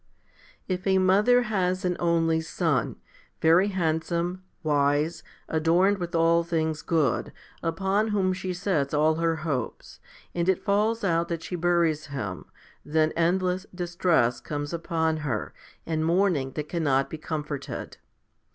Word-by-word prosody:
11. 185 -1 -2
If 195 - -6
a 190 0 +4
mother 205 +7 +4
has 185 -4 -1
an 180 -1 +1
only 165 -1 +2
son, 160 -5 -1 0.4
very 165 +5 +5
handsome, 175 0 -1 0.2
wise, 150 +2 +1 0.3
adorned 175 +5 +2
with 175 -1 -4
all 165 +1 +4
things 160 -2 -1
good, 155 -7 0 0.3
upon 195 +6 0
whom 195 -3 +1
she 185 0 -4
sets 175 -6 -1
all 155 +2 +4
her 165 0 +1
hopes, 130 -7 -4 0.3
and 175 +1 0
it 190 - +1
falls 215 +2 +1
out 170 -3 +1
that 170 -1 -4
she 180 - -4
buries 170 -3 +1
him, 105 - -5 0.4
then 155 +1 +1
endless 180 +3 +1
distress 175 -9 +1
comes 145 +4 -5
upon 160 -1 0
her, 135 -9 -3 0.3
and 160 -1 -1
mourning 165 -6 +1
that 150 0 -4
cannot 145 -5 +1
be 160 - -7
comforted. 150 -3 -5
165 Hz, 140 wpm, -26 LUFS, 155-185 Hz, 0.4 s, very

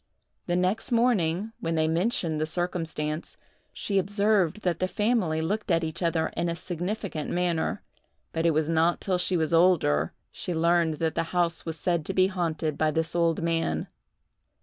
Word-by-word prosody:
The 175 - +1
next 185 +8 0
morning, 220 -5 +2
when 165 0 -2
they 155 0 +2
mentioned 165 -2 0
the 155 - 0
circumstance, 165 -2 -3 0.3
she 195 -2 -1
observed 200 -1 +1
that 175 -3 0
the 185 - +1
family 205 -7 +1
looked 205 +7 -2
at 165 -1 +2
each 160 +2 -4
other 165 -2 +1
in 170 +1 0
a 170 - -2
significant 175 -1 -4
manner; 175 -2 -1 0.5
but 165 - -1
it 170 - +4
was 155 0 +1
not 165 +1 +2
till 185 -2 0
she 180 0 +1
was 160 0 0
older 160 - +3 0.2
she 175 - -4
learned 170 -1 +2
that 160 +1 -1
the 165 - 0
house 170 -1 +1
was 160 -1 -3
said 170 0 0
to 195 - -3
be 185 - +5
haunted 165 -5 -2
by 155 - +3
this 160 +2 -1
old 165 -1 +1
man. 165 - 0
170 Hz, 175 wpm, -27 LUFS, 160-185 Hz, 0.5 s, be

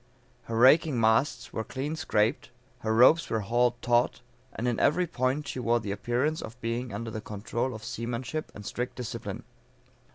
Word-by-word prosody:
Her 115 - -3
raking 135 +2 +5
masts 110 +5 +2
were 110 - -2
clean 140 +7 -4
scraped, 115 -6 0 0.3
her 110 - -2
ropes 130 +9 +5
were 110 - 0
hauled 120 +3 +1
taught, 120 0 +2 0.3
and 120 - -3
in 120 - 0
every 175 +5 +3
point 140 -2 -1
she 130 - -4
wore 120 -1 +2
the 105 -3 -4
appearance 125 +9 -1
of 115 +3 -9
being 115 +1 -3
under 115 -1 -5
the 110 - -5
control 115 +5 -3
of 110 - -9
seamanship 120 +6 -4
and 105 - -9
strict 125 +4 -4
discipline. 125 -4 -5
120 Hz, 170 wpm, -28 LUFS, 115-130 Hz, 0.3 s, raking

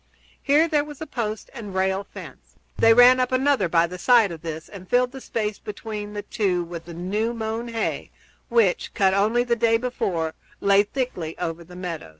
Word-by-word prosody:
Here 295 +4 +4
there 300 -3 +2
was 295 -2 -10
a 315 - -5
post 220 -7 -4
and 210 -7 -8
rail 190 +1 +1
fence. - - -12 0.2
They 225 - +5
ran 245 +2 +7
up 255 0 +1
another 255 -7 +2
by 165 0 +4
the 180 +1 -8
side 230 -3 +5
of 165 -2 -8
this 160 -1 -6
and 185 -2 -12
filled 250 0 +3
the 265 0 -9
space 215 -4 -3
between 210 0 -6
the 205 0 -5
two 190 -5 0
with 170 -1 -8
the 170 -1 -9
new 210 +7 -2
mown 225 +1 -3
hay, 230 -1 -3 0.4
which, 230 -7 +1
cut 190 -1 +3
only 215 +5 +2
the 240 -1 +1
day 230 0 +3
before, 180 -9 -2 0.3
lay 200 0 +5
thickly 205 - -4
over 170 -1 -4
the 180 +2 -14
meadows. 175 - -6
210 Hz, 195 wpm, -24 LUFS, 180-240 Hz, 0.4 s, ran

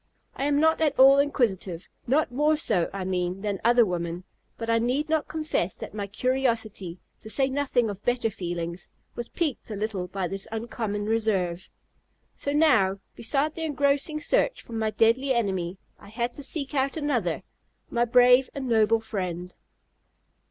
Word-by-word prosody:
I 275 - -2
am 290 0 +2
not 320 +1 +3
at 295 -3 +2
all 270 +1 +8
inquisitive 200 - 0 0.2
not 275 +2 +2
more 300 +4 +2
so, 195 - +1
I 195 -1 -4
mean, 185 0 -2
than 200 -2 -3
other 240 0 +5
women 175 -1 -3 0.3
but 230 - -5
I 230 0 +3
need 260 +7 0
not 315 -2 +1
confess 310 - -2
that - - -7
my 205 -1 -4
curiosity 225 -6 -1 0.2
(to 220 - -11
say 265 +5 +2
nothing 265 -4 +1
of 205 -1 -6
better 240 -2 +1
feelings) 175 -1 -5 0.2
was 240 -1 -6
piqued 305 -10 -2
a 215 - -4
little 200 -3 -3
by 190 -1 -3
this 195 +2 -5
uncommon 220 -2 -3
reserve. 200 -5 0 0.6
So 280 - -4
now, 255 -11 +4 0.2
beside 285 +6 0
the 325 - -7
engrossing 290 0 0
search - - +1
for 235 - -12
my 220 -1 0
deadly 245 +5 +2
enemy, 190 -5 -1 0.2
I 200 - -14
had 235 +3 -2
to 285 - -7
seek 280 0 -3
out 275 +1 0
another, 245 - -1 0.5
my 235 - +2
brave 250 +2 +5
and 270 -2 -4
noble 225 -1 +3
friend. 180 -5 -4
230 Hz, 165 wpm, -26 LUFS, 195-275 Hz, 0.6 s, all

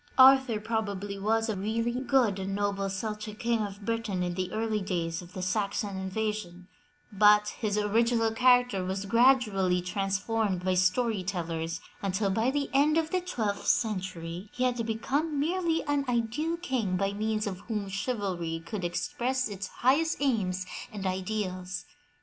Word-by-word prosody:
Arthur 265 -4 +7
probably 205 -3 -3
was 225 +3 +1
a 220 - -1
really 225 +4 -1
good 255 -7 +2
and 195 +1 -3
noble 200 -1 -1
Celtic 210 +2 -4
King 235 0 0
of 205 -1 -5
Britain 230 -5 -1
in 175 0 -2
the 185 0 -3
early 220 -1 -1
days 170 -3 -2
of 175 0 -13
the 185 - -4
Saxon 200 +1 -1
invasion, 190 -2 -3 0.4
but 210 +1 +5
his 210 -2 0
original 225 +2 +2
character 245 -4 +4
was 190 +2 -3
gradually 215 -5 +4
transformed 195 +1 -1
by 185 - +2
story 190 +4 +2
tellers 165 -3 -3 0.2
until 195 +1 0
by 225 +5 +2
the 280 +1 -1
end 295 +3 +4
of 320 -1 0
the 370 -1 +1
twelfth 220 - -2
century 185 -3 -1
he 255 - -1
had 245 -2 +1
become 280 +7 -1
merely 330 +1 +1
an 290 -1 0
ideal 245 +8 0
king 250 - -1
by 195 +1 0
means 215 +1 -1
of 190 -3 -4
whom 210 -3 -2
chivalry 190 -6 -2
could 190 +2 -4
express 250 +9 -1
its 200 -2 -5
highest 295 +6 +2
aims 195 -10 0 0.3
and 205 -3 -6
ideals. 185 -1 -3
210 Hz, 155 wpm, -29 LUFS, 190-235 Hz, 0.4 s, Arthur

